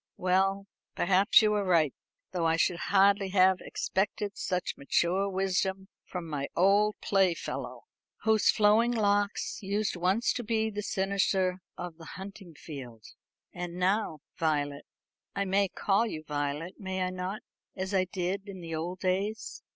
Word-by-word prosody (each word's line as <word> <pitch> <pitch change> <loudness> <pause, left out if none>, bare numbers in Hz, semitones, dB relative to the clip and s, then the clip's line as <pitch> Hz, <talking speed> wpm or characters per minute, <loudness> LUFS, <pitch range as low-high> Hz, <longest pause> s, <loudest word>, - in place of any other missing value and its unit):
"Well, 195 +2 +1 0.3
perhaps 195 +5 +5
you 210 0 +3
are 205 -1 +1
right; 165 -7 +3 0.4
though 175 -3 0
I 160 - +3
should 170 +1 +1
hardly 200 0 +4
have 190 -1 +4
expected 200 +1 -2
such 180 -1 -2
mature 180 +7 +1
wisdom 190 0 -1 0.2
from 180 -2 -6
my 140 -3 -3
old 205 +3 +4
playfellow, 190 -4 0 0.4
whose 220 -1 +4
flowing 215 +3 +4
locks 205 -2 0
used 205 +1 -1
once 185 +7 +1
to 240 - -4
be 220 0 0
the 210 0 -3
cynosure 190 -2 0 0.2
of 175 -2 -6
the 165 - -12
hunting 190 -3 -10
field. 125 -9 -9 0.5
And 175 -1 -5
now, 180 -4 0 0.2
Violet 145 -3 -1 0.5
I 200 - 0
may 195 +1 +2
call 200 +4 +1
you 155 -7 -5
Violet, 150 +3 -3
may 190 -2 -2
I 185 - -1
not, 185 +3 -4 0.3
as 190 +1 -4
I 185 -1 +3
did 190 +2 -3
in 190 -2 -8
the 165 -2 -7
old 175 +4 -4
days? 195 +4 -2
190 Hz, 150 wpm, -29 LUFS, 175-200 Hz, 0.5 s, perhaps